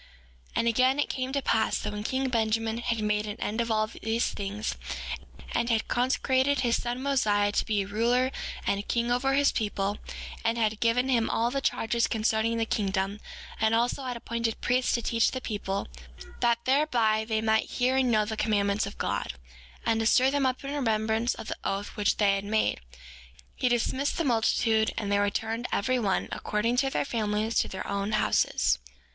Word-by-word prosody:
6:3 - - -28
And 230 - +1
again, 255 +4 +3
it 290 - +1
came 260 -1 -3
to 280 0 -1
pass 220 -1 +2
that - - -4
when 210 - -4
king 265 +4 -1
Benjamin 225 -1 0
had 235 -2 -1
made 210 0 0
an 210 - -6
end 220 +3 -1
of 235 - -2
all 215 -1 +2
these 225 +1 -2
things, 205 +2 -3 0.8
and 235 0 0
had 225 -1 +1
consecrated 260 +2 +1
his 240 -2 +1
son 245 +1 -3
Mosiah 210 -7 +2
to - - 0
be 210 -3 +1
a - - -9
ruler 240 +5 +1 0.3
and 200 - +1
a - - -1
king 235 +3 -1
over 270 +2 +2
his 285 0 +4
people, 205 -1 -2 0.4
and 230 +1 +1
had 220 -2 0
given 240 +2 +2
him 235 -4 +2
all 235 +1 +1
the 275 +1 -1
charges 235 -5 +1
concerning 220 +1 +1
the 225 - +1
kingdom, 195 -1 -1 0.4
and 220 +1 +3
also 240 +4 +1
had 250 -2 -3
appointed 230 -1 -2
priests 250 +1 +1
to 235 - 0
teach 230 +1 +2
the 260 - -4
people, 200 -5 -3 0.5
that 235 -1 +1
thereby 245 -6 +2
they 220 0 -1
might 220 0 +1
hear 255 +1 +1
and 265 -1 +3
know 215 -2 +3
the 220 +1 -3
commandments 205 -1 +1
of 200 - -9
God, - - -2 0.5
and 225 - +2
to 225 - +1
stir 260 +3 +4
them 280 -2 +2
up 255 +1 -2
in 275 +1 -4
remembrance 225 -3 0
of - - -8
the - - -4
oath 195 +1 -2
which 210 -2 +1
they 200 -2 +4
had 195 0 -1
made, 215 +2 +1 0.8
he 255 - +1
dismissed 260 +4 0
the 335 - +1
multitude, 225 -3 +2
and 205 -3 -2
they 200 - +3
returned, 225 +4 -1
every 255 +5 +1
one, 200 -5 0
according 230 +3 -1
to 270 +1 +2
their - - -1
families, 215 -2 -1
to - - +1
their 190 - -6
own 200 +1 -2
houses. 65 - +2
225 Hz, 200 wpm, -28 LUFS, 215-250 Hz, 0.8 s, his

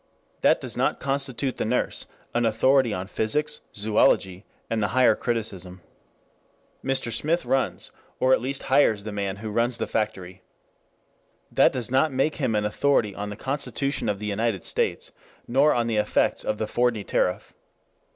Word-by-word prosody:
That - - +4
does - - -6
not - - 0
constitute 135 -1 -2
the - - -1
nurse 125 +3 -1 0.3
an 120 - +1
authority 120 +3 +3
on 90 -2 -3
physics, 150 +10 -2
zoology, 100 -2 +2 0.2
and 115 -1 -1
the 100 - +2
Higher 125 -3 +6
Criticism. 95 -6 -3 1.0
Mr. 130 -3 0
Smith 155 +6 +1
runs, 130 +1 -1 0.3
or 130 0 +4
at - - +3
least 135 +2 -3
hires, 130 -7 +3
the 110 - -5
man 100 -2 -2
who 105 +1 -6
runs 115 +2 +1
the - - -2
factory. 95 -4 -3 1.1
That - - +5
does 125 -1 -4
not 135 +4 +3
make 135 +4 0
him 130 -7 0
an 105 0 +1
authority 105 -1 +1
on 105 +1 -5
the 105 - -6
Constitution 140 +2 -2
of 100 - 0
the 105 - -6
United 105 -1 -1
States, - - -1 0.4
nor 140 +5 +4
on 120 -1 +1
the 115 -2 -1
effects 105 0 +1
\of 105 - -1
the 110 - -1
Fordney 115 -2 0
tariff. 90 - -1
115 Hz, 165 wpm, -25 LUFS, 105-130 Hz, 1.1 s, Higher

